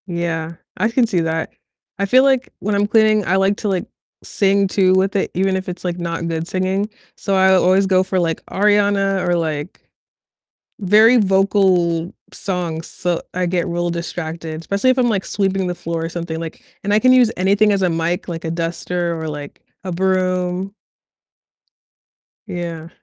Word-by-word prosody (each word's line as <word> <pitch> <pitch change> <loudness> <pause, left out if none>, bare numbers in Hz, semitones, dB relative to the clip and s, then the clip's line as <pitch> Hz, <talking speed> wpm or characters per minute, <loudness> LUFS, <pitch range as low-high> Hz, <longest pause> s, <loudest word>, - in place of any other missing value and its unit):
Yeah, 170 -2 -3 0.2
I 215 - +1
can 240 +1 +2
see 185 -5 0
that. 160 0 -2 0.5
I 200 - +1
feel, 255 +6 +5
like, 265 -2 +2
when 210 +2 -2
I'm 205 0 +1
cleaning, 215 -1 +3
I 180 - +1
like 195 +1 +2
to, 215 - -4
like, 185 -2 -1 0.4
sing 200 0 +1
too 185 -1 +2
with 190 +1 +1
it, 195 - 0
even 190 +1 +1
if 190 0 -4
it's, 180 0 -7
like, 175 -1 -2
not 170 -1 -3
good 165 0 -3
singing. 190 +3 -1 0.3
So, 195 - -2
I 190 0 +5
always 185 +1 +4
go 185 -1 +3
for, 190 0 -1
like, 165 -2 -1
Ariana 200 -2 +2
or, 175 - +2
like 160 -1 -3 1.0
very 215 +6 +6
vocal 190 -4 +2 0.2
songs, 170 -4 -4
so 175 -1 -2
I 180 0 -1
get 175 0 -1
real 175 0 -1
distracted, 165 -1 -5
especially 200 +8 0
if 255 - -1
I'm, 245 -2 +3
like, 200 -4 -1
sweeping 195 -2 -1
the 180 - -3
floor 165 -1 -4
or - - -4
something, 170 -1 -5
like 165 -1 -8 0.2
and 205 - +1
I 210 - +5
can 255 +3 +4
use 250 -3 +5
anything 200 +3 +3
as 195 - 0
a 185 - +2
mic, 165 +2 -2
like, 165 -1 -5
a 160 - -2
duster 170 0 -2
or, 160 - -4
like, 145 -1 -7 0.2
a 185 - -4
broom. 185 +1 0 1.7
Yeah. 170 -3 -5
185 Hz, 180 wpm, -19 LUFS, 170-200 Hz, 1.7 s, very